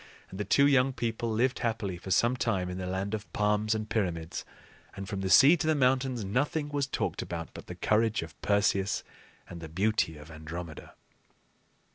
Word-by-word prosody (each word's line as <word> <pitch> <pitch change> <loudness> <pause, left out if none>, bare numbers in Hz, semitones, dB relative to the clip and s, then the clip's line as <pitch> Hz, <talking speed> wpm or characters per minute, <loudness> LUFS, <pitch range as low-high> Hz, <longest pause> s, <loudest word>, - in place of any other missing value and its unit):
And 95 - -8
the 105 - -1
two 140 +8 +4
young 135 -2 +4
people 115 -1 -2
lived 120 +4 +1
happily 110 -6 -2
for 95 - -9
some 120 +6 +3
time 95 -7 -1
in 90 - -5
the 90 - -4
land 95 +3 -2
of 105 -1 -5
palms 105 +1 +1
and 110 -1 -3
pyramids; 85 -7 -2 0.5
and, 95 0 -6
from 95 0 -4
the 95 - -2
sea 140 - +8
to 155 - -2
the 155 - +3
mountains, 130 -4 +1
nothing 145 +8 -1
was 145 -2 -1
talked - - -2
about 85 -1 -5
but - - -10
the - - -7
courage 110 -2 +1
of 80 -2 -12
Perseus 100 -1 +1 0.4
and 85 - -9
the 80 - -7
beauty 95 -2 0
of 75 +2 -12
Andromeda. 80 +1 -8
105 Hz, 190 wpm, -29 LUFS, 90-120 Hz, 0.5 s, sea